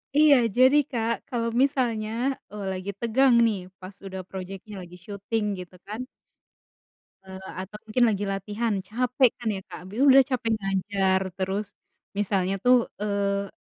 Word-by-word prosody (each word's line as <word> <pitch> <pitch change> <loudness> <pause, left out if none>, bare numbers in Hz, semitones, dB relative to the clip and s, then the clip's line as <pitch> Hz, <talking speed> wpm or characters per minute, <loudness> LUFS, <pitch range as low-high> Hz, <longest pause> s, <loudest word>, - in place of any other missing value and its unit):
Iya, 300 -1 +7 0.2
jadi 260 +3 +6
Kak, 230 -1 0
kalo 235 -3 -2 0.2
misalnya, 240 -6 +1 0.4
eee, 210 -1 -6
lagi 185 +1 -5
tegang 245 +3 +3
nih, 210 -4 +1 0.2
pas 190 +1 -10
udah 190 -1 -5
project-nya 195 +2 -8
lagi 175 0 -11
syuting, 210 +2 -3
gitu 180 0 -10
kan— 225 +5 -5 1.2
eee, 190 0 -9 0.2
atau 205 +3 -8
mungkin 240 +3 +2
lagi 205 -1 -1
latihan, 205 +3 -2
capek 250 +3 +2
kan 230 -2 -2
ya 190 - -5
Kak. - - -10
Biu 245 +8 +1
udah 270 0 +8
capek 245 -4 -1
ngajar, 195 -1 0 0.2
terus 190 +2 -2 0.4
misalnya 195 -2 +1
tuh, 250 -1 +5 0.2
eee, 200 -1 -1
210 Hz, 145 wpm, -26 LUFS, 195-240 Hz, 1.2 s, udah